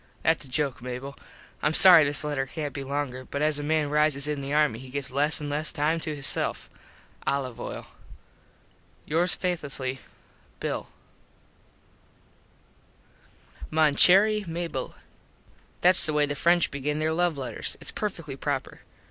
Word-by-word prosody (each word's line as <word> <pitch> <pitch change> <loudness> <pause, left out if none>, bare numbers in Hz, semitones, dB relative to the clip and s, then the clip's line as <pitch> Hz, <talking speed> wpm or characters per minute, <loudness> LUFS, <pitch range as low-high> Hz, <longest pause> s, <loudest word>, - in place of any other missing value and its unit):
Thats 160 -2 +1
a - - -12
joke 140 -1 -2
Mable. 125 +3 -7 0.5
Im 150 +2 0
sorry 180 -5 +10
this 145 +1 +1
letter 145 -3 -3
cant 145 +1 -6
be 140 - -6
longer 135 -2 -4
but 140 +3 -4
as 155 -1 +1
a - - -5
man 150 -1 -1
rises 150 -2 +2
in 150 -2 -3
the 135 +1 -6
army 150 -6 +1
he 130 0 -12
gets 135 -1 -5
less 145 +4 +3
an 150 - -5
less 150 +2 -3
time 160 +1 -1
to 155 -1 -4
hisself. 140 -2 0 0.6
Olive 130 -4 -2
oil. - - -7 1.2
Yours 170 +4 +1
faithlessly, 140 -7 -3 0.6
Bill. - - -4 2.8
Mon 155 -2 +2
Cherry 205 +7 +5
Mable: 165 -5 -5 0.9
Thats 180 -1 +4
the 155 - -2
way 150 0 +2
the 145 - -4
French 170 +4 +2
begin 145 +2 -3
there 155 +1 -1
love 175 -2 0
letters. 125 -5 -4
Its - - -8
perfectly 165 -9 -5
proper. - - -5
150 Hz, 150 wpm, -25 LUFS, 140-160 Hz, 2.8 s, sorry